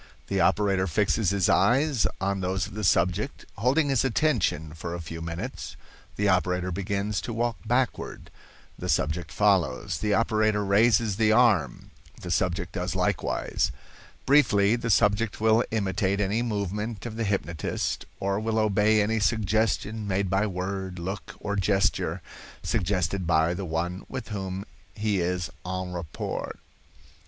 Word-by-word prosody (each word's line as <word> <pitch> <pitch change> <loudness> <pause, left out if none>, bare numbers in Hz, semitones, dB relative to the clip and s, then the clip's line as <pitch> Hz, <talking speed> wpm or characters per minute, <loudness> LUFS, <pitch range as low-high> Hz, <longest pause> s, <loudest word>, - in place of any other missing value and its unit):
The 95 -1 +1
operator 95 0 +2
fixes 100 +3 +1
his 100 -2 +2
eyes 135 -1 +3
on 100 0 -1
those 95 +1 -1
of - - -10
the 105 +1 -5
subject. 90 +7 +1
Holding 140 +7 +2
his 135 -4 +2
attention 110 - +1
for 85 +1 -5
a - - -5
few 80 0 -7
minutes, 85 +1 -5 0.4
the 105 - +1
operator 90 -1 +1
begins 100 +2 -2
to - - -5
walk 115 0 -1
backward; 125 +2 -1 0.5
the - - -4
subject 75 +2 0
follows. 90 -8 +1
The 105 -1 +1
operator 110 -1 +2
raises 105 +1 +3
the 110 -1 +3
arm; 110 -7 +2 0.3
the 90 - -6
subject 90 +1 0
does - - -3
likewise. - - 0 0.5
Briefly, 115 -7 +4
the 115 -1 -3
subject 105 0 +2
will 110 +2 +4
imitate 100 -2 0
any 105 +3 +1
movement 105 -1 -3
of 115 -2 -5
the 115 - -2
hypnotist, 85 -6 -2
or 100 +1 0
will 110 0 -1
obey 105 0 +3
any 110 +2 0
suggestion 110 0 0
made 95 -1 0
by 100 +3 +2
word, 95 0 -4
look 95 +4 -5
or 100 -1 -3
gesture, 100 0 +1 0.4
suggested 95 -3 0
by 80 0 +3
the 95 +2 -4
one 90 +3 -3
with 130 -4 -6
whom 95 -2 -4 0.3
he 105 -2 0
is 90 -1 -1
en 90 0 -4
rapport. 85 -4 -4
100 Hz, 145 wpm, -26 LUFS, 90-110 Hz, 0.5 s, Briefly